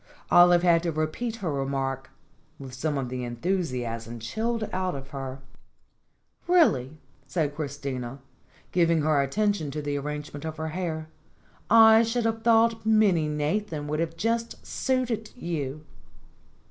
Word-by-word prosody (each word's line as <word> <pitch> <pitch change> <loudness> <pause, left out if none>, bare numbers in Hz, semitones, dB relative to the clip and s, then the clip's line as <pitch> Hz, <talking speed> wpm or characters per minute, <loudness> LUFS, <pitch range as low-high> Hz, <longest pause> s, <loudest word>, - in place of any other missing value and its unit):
Olive 175 0 +7
had 170 -2 +5
to 170 -1 -1
repeat 155 +10 -2
her 160 - 0
remark, 135 -1 -2 0.5
with 135 -3 -9
some 145 +3 -2
of 130 -2 -3
the 125 0 -4
enthusiasm 120 - -3
chilled 220 - -2
out 185 -2 -1
of 135 0 -8
her. 135 -1 -6 1.1
"Really!" 155 - +3 0.3
said 155 -5 -1
Christina, 140 -4 -4 0.5
giving 170 -3 +3
her 150 -2 +3
attention 200 +2 0
to 145 +2 -4
the 145 0 -2
arrangement 150 0 -6
of 160 0 -5
her 160 0 -3
hair. 160 -2 -3 0.6
"I 225 0 +8
should 230 +1 0
have 225 0 0
thought 230 0 +3
Minnie 210 -8 +3
Nathan 150 +2 -2
would 160 +2 -2
just 230 +1 -1
have - - -23
suited 250 -5 -1
you." 155 - -4
155 Hz, 135 wpm, -26 LUFS, 140-210 Hz, 1.1 s, I